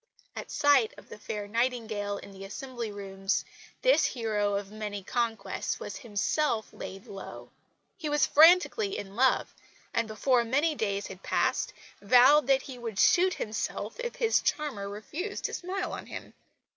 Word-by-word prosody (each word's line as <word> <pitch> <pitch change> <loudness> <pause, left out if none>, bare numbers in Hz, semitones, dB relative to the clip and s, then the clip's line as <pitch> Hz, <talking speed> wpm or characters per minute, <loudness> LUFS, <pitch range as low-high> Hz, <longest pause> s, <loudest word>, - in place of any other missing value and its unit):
At - - -6
sight 280 -6 +3
of - - -15
the - - -10
fair 210 -1 -5
Nightingale 220 -3 -1
in - - -10
the 195 0 -10
Assembly 240 +2 -6
Rooms 195 -1 -2 0.4
this - - +5
hero 210 -4 0
of 200 0 -4
many 210 -2 -5
conquests 225 -1 -2
was - - -6
himself 235 +1 -1
laid 195 +1 -8
low. 195 -1 -9 0.5
He 310 -3 -3
was 295 0 +3
frantically 365 +6 +5
in 195 0 -7
love, 260 +2 +2 0.4
and 230 -1 +1
before 240 +3 +2
many 285 +7 +1
days 200 -7 -2
had 190 -1 -9
passed - - 0 0.3
vowed 255 +6 +6
that 270 -1 +3
he 255 -3 -9
would 225 -4 -5
shoot 370 - +4
himself 220 - -4
if 485 -1 -4
his 460 -1 +2
charmer 260 -10 -2
refused 300 - -5
to - - -2
smile 370 +2 -3
on - - -7
him. - - -8
230 Hz, 160 wpm, -29 LUFS, 205-295 Hz, 0.5 s, vowed